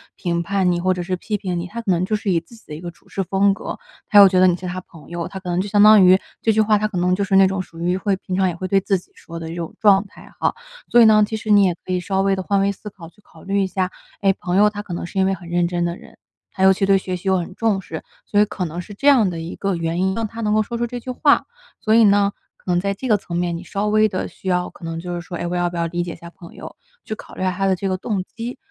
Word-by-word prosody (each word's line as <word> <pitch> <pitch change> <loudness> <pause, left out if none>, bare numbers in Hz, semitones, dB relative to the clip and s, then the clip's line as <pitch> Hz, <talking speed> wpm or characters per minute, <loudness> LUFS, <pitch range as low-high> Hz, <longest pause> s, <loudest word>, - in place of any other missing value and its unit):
评 170 -2 -2
判 190 0 +1
你 175 - 0
或 185 +1 +1
者 180 -1 -4
是 185 0 -2
批 210 +4 -3
评 185 -4 -3
你， 175 - -5
他 235 +5 -6
可 195 - -1
能 175 +1 +1
就 215 - 0
是 205 -2 -1
以 170 - +2
自 175 +8 -17
己 225 - -19
的 150 - -8
一 155 - -7
个 175 0 -6
处 170 - -19
事 195 - -3
风 195 +2 +2
格， - - -6 0.3
他 210 - +3
又 200 -1 +10
觉 185 -1 +2
得 185 - +6
你 175 - +3
是 180 - -9
他 180 +1 -4
朋 165 -4 -15
友。 170 -1 -4
他 190 -1 -8
可 180 - -6
能 175 +1 0
就 200 - -1
相 205 0 +4
当 215 -1 +8
于 185 +1 +7 0.2
这 220 - +2
句 220 - +3
话， 215 -1 +3
他 215 +1 0
可 195 -4 -6
能 180 +1 +2
就 200 - -1
是 195 -1 +1
那 195 0 +7
种 190 0 -1
属 165 -2 -11
于 180 +2 +1
会 195 0 0
平 185 -1 -8
常 190 0 +2
也 175 - -2
会 185 - -6
对 195 - +4
自 195 0 0
己 180 - -15
说 165 0 -10
的 160 0 -6
一 - - -6
种 170 -2 -6
状 200 -1 +4
态 - - -16
哈。 - - 0 0.3
所 240 - +6
以 - - +8
呢， 215 -1 +6
其 220 - -4
实 215 0 -6
你 205 -1 +6
也 175 -2 +1
可 185 - -5
以 180 - +1
稍 190 +1 -1
微 195 0 +2
地 190 - -1
换 200 +1 +1
位 200 0 +2
思 210 +2 -9
考， 170 -4 -13
去 205 - -28
考 160 -4 -18
虑 195 +1 -1
一 - - -1
下， 185 -1 -2 0.3
哎， 195 -1 +3
朋 180 0 -2
友 210 +1 +6
他 205 -1 -6
可 180 - -7
能 170 - -4
是 195 - -9
因 190 - +4
为 195 - +1
很 170 -2 -9
认 175 0 +1
真 175 -1 -1
的 170 +1 -2
人， - - -17 0.3
他 190 - -2
尤 190 - +7
其 195 +1 +1
对 195 0 +4
学 185 -1 -4
习 180 +2 -8
又 190 0 +3
很 175 +1 -5
重 215 -4 0
视， - - -7 0.2
所 205 - +1
以 210 - +6
可 195 -3 -4
能 165 +2 -6
是 190 +4 -8
这 275 +8 -2
样 250 -8 +6
的 170 -2 -5
一 165 +2 -6
个 195 -2 -1
原 170 +1 -2
因， 190 +1 +1
让 225 -1 -2
他 225 +2 -8
能 210 -1 +1
够 215 - +3
说 235 +3 -4
出 240 - 0
这 245 +1 -6
句 255 - -10
话。 285 +3 +3 0.4
所 220 0 +2
以 230 - +7
呢， 200 -1 +4 0.2
可 180 - -5
能 175 - +2
在 200 +2 -1
这 255 +6 -6
个 215 -3 +4
层 180 -3 -7
面， 175 -1 -1
你 180 - -9
稍 200 +3 -3
微 215 +1 +4
地 185 - -3
需 - - -12
要 180 -1 0
可 - - -12
能 165 0 -4
就 175 0 -5
是 170 - -4
说， 175 0 -7
哎， - - -3
我 180 - -3
要 175 0 +1
不 175 - -7
要 170 0 0
理 175 +1 -2
解 175 -1 -6
一 - - -10
下 170 - -11
朋 170 -1 -14
友， - - -10 0.3
去 215 - -5
考 - - -13
虑 - - -7
下 185 0 +1
他 195 +2 -2
的 190 -1 +3
这 195 +1 -3
个 185 - -1
动 195 -1 -2
机。 235 +5 -7
190 Hz, 365 characters per minute, -21 LUFS, 175-205 Hz, 0.4 s, 又